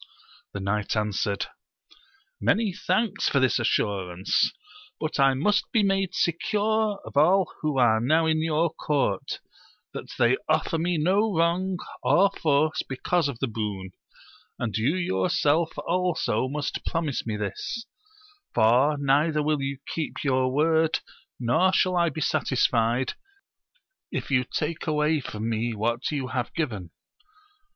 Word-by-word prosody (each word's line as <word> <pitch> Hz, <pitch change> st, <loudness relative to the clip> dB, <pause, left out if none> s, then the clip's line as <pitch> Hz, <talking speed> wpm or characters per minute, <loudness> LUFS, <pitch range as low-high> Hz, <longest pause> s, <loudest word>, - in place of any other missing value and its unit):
The 100 Hz, -, -4 dB
knight 100 Hz, +2 st, -1 dB
answered, 105 Hz, -1 st, -1 dB, 0.9 s
Many 200 Hz, -, +1 dB
thanks 215 Hz, +3 st, 0 dB
for 140 Hz, -, +2 dB
this 130 Hz, -1 st, +2 dB
assurance! 95 Hz, -5 st, 0 dB, 0.5 s
but 155 Hz, -2 st, -3 dB
I 135 Hz, -1 st, +5 dB
must 205 Hz, +10 st, +1 dB
be 220 Hz, -, +3 dB
made 195 Hz, -2 st, 0 dB
secure 210 Hz, +4 st, 0 dB
of -, -, -10 dB
all 180 Hz, +5 st, +4 dB
who 150 Hz, -3 st, -1 dB
are 115 Hz, -3 st, +4 dB
now 155 Hz, +8 st, +2 dB
in 160 Hz, 0 st, +1 dB
your 160 Hz, +1 st, +1 dB
court, 140 Hz, -12 st, -1 dB, 0.5 s
that -, -, -7 dB
they 120 Hz, +2 st, +3 dB
offer 155 Hz, +1 st, +1 dB
me 175 Hz, +1 st, 0 dB
no 195 Hz, +8 st, +2 dB
wrong 180 Hz, +3 st, +1 dB, 0.2 s
or 200 Hz, +2 st, +4 dB
force 155 Hz, -1 st, +1 dB
because 145 Hz, +5 st, -1 dB
of 140 Hz, -4 st, -5 dB
the 135 Hz, -, -1 dB
boon, 105 Hz, -4 st, -4 dB, 0.7 s
and 110 Hz, -4 st, -3 dB
you 125 Hz, +9 st, +1 dB
yourself 155 Hz, -, +1 dB
also 170 Hz, -9 st, 0 dB
must 145 Hz, 0 st, -3 dB
promise 160 Hz, -7 st, -2 dB
me 110 Hz, -2 st, -2 dB
this; 105 Hz, -, -4 dB, 0.7 s
for 125 Hz, +7 st, +4 dB
neither 145 Hz, +2 st, +2 dB
will 150 Hz, -1 st, 0 dB
you 135 Hz, 0 st, -3 dB
keep 160 Hz, -2 st, -4 dB
your 130 Hz, -2 st, +1 dB
word, 160 Hz, +3 st, +2 dB, 0.4 s
nor 125 Hz, +10 st, +3 dB
shall 185 Hz, -1 st, +2 dB
I 170 Hz, -1 st, +3 dB
be 155 Hz, +1 st, -6 dB
satisfied, 125 Hz, -4 st, +1 dB, 1.0 s
if -, -, -4 dB
you 125 Hz, -2 st, +3 dB
take 160 Hz, +2 st, -3 dB
away 150 Hz, 0 st, +2 dB
from 110 Hz, -4 st, -5 dB
me 115 Hz, +1 st, -1 dB
what 115 Hz, +3 st, -1 dB
you 140 Hz, -4 st, -3 dB
have 125 Hz, -1 st, -2 dB
given. 110 Hz, -, -3 dB
145 Hz, 140 wpm, -26 LUFS, 120-170 Hz, 1.0 s, I